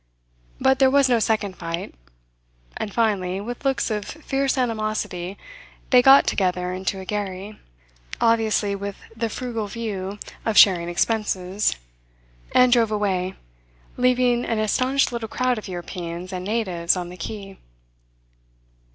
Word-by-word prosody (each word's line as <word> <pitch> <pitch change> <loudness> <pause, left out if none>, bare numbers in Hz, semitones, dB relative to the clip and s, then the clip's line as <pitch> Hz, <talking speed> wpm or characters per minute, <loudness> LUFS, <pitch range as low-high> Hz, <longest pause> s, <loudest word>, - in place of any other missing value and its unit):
But 265 0 +3
there 265 -1 +6
was 280 0 +4
no 245 -2 +3
second 210 -4 0
fight; 165 0 -5 0.8
and 205 - -4
finally, 195 -5 0
with 240 +6 -6
looks 270 -4 0
of 210 -1 -1
fierce 275 -2 -2
animosity, 215 -6 -2 0.5
they 250 -1 +8
got 270 +2 +7
together 180 -1 0
into 190 +1 -3
a 190 - -8
gharry 205 0 -4 0.6
obviously 220 -3 +2
with 200 0 -5 0.2
the 225 0 -2
frugal 230 -2 -4
view 200 -3 -4 0.3
of 220 -2 0
sharing 175 -4 +6
expenses 195 0 0 0.8
and 250 -1 +5
drove 230 -3 +4
away, 190 -3 -1 0.6
leaving 250 -1 +2
an 230 - -1
astonished 255 +6 +1
little 230 -2 -4
crowd 250 -1 0
of 210 - -10
Europeans 175 0 -6
and 180 0 -4
natives 190 -6 0
on 175 -1 -4
the 180 - -9
quay. 195 +2 -7
210 Hz, 135 wpm, -23 LUFS, 185-240 Hz, 0.8 s, they